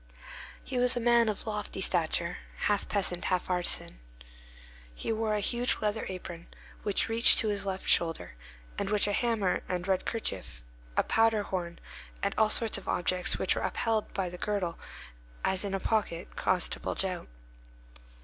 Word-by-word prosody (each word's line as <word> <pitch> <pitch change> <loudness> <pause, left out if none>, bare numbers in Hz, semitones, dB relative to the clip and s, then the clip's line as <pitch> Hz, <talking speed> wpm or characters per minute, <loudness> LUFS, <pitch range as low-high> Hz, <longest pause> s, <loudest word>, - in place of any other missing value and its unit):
He 255 -1 -3
was 250 0 +3
a - - +2
man 235 -1 +4
of 210 - -4
lofty 210 -3 -4
stature, 170 -1 +1 0.2
half 205 -1 0
peasant, 185 -3 0
half 185 0 0
artisan. 175 - 0 1.0
He - - -3
wore 220 -1 0
a - - 0
huge 240 +4 +2
leather 215 +1 -1
apron, 175 -2 -7 0.3
which 205 -2 +1
reached 225 +1 +6
to 220 - +3
his 200 -1 -1
left 190 0 -3
shoulder, 165 -1 +2 0.5
and 200 - -1
which 210 -1 +4
a 205 - 0
hammer, 220 -5 +1
a - - -1
red 180 +1 -4
handkerchief, 95 - -4 0.3
a - - +4
powder 225 -2 +3
horn, 175 -3 -4 0.5
and - - +1
all 220 -1 +4
sorts 225 0 +2
of - - -16
objects 180 +1 0
which - - +2
were - - -2
upheld 225 -3 0
by 190 -2 -2
the 180 0 -8
girdle, 195 -5 -2 0.7
as 190 0 0
in 195 -1 -2
a - - -1
pocket, 195 -6 -1
caused 180 -2 +1
to - - -1
bulge - - -2
out. 185 - -4
200 Hz, 170 wpm, -30 LUFS, 180-220 Hz, 1.0 s, reached